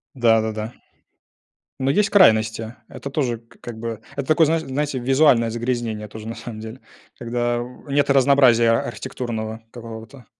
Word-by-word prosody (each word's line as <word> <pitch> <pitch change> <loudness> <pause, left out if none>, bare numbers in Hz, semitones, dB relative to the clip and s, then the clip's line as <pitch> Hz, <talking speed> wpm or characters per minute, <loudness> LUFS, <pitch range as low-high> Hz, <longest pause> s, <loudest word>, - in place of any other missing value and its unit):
Да-да-да. 110 -2 +1 1.1
Но 135 0 0
есть 200 +9 +2
крайности, 110 - +3
это 140 - -8
тоже, 130 -5 -1
к 115 0 -24
как 115 -2 -8
бы 115 - -5
это, 115 -2 -5
это 140 - -3
такое 160 +1 +5
знаешь 160 +1 +1
знаете, 140 -1 -2
визуальное 130 -2 +4
загрязнение 115 -2 -3
тоже, 110 +1 -9
на 115 - -5
самом 115 -1 -8
деле, 110 +3 -8 0.4
когда 120 0 -1 0.3
нет 140 0 +1
разнообразия, 135 -4 +5
а 115 - +1
архитектурного 115 -2 -5
какого-то. 115 +2 -10
120 Hz, 150 wpm, -22 LUFS, 110-135 Hz, 1.1 s, такое